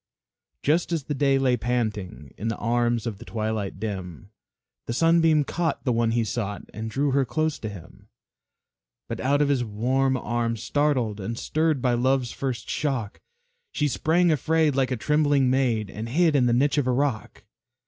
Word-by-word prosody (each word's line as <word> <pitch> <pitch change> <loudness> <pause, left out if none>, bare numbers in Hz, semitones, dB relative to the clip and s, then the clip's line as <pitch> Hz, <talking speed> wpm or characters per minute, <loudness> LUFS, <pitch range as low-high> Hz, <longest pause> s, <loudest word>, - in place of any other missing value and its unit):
Just 165 +5 +1
as 165 -4 -1
the 145 - -3
day 140 -1 +2
lay 130 -2 +2
panting 105 - -3
In 110 - -4
the 115 - -2
arms 120 0 0
of 110 -4 -4
the - - -9
twilight 110 -4 -3
dim, 95 - -6 0.6
The 115 - -2
Sunbeam 165 +1 +4
caught 165 +3 -2
the 130 - +1
one 115 0 +1
he 120 -1 +2
sought 105 -2 -3
And 110 +1 -5
drew 140 +5 0
her 140 +1 +3
close 155 +3 -1
to 110 - -4
him. 90 -5 -12 1.0
But - - -5
out 145 +3 +2
of 145 - 0
his 135 -3 +2
warm 130 +5 0
arms, 115 -2 -2
startled 130 -8 0
And 115 +4 -4
stirred 155 -2 0
by 125 -2 +2
Love's 125 0 +1
first 130 -3 -4
shock, 130 -8 -2 0.5
She 150 - +1
sprang 165 +5 +2
afraid, 155 0 +2
like 135 -2 +1
a 130 - -1
trembling 145 -1 +2
maid, 120 -6 +1
And 110 +2 -6
hid 160 +3 +3
in 125 -3 +4
the 120 - +2
niche 140 +4 +2
of 135 - -1
a - - +3
rock. 130 -5 -2
125 Hz, 180 wpm, -25 LUFS, 115-145 Hz, 1.0 s, Sunbeam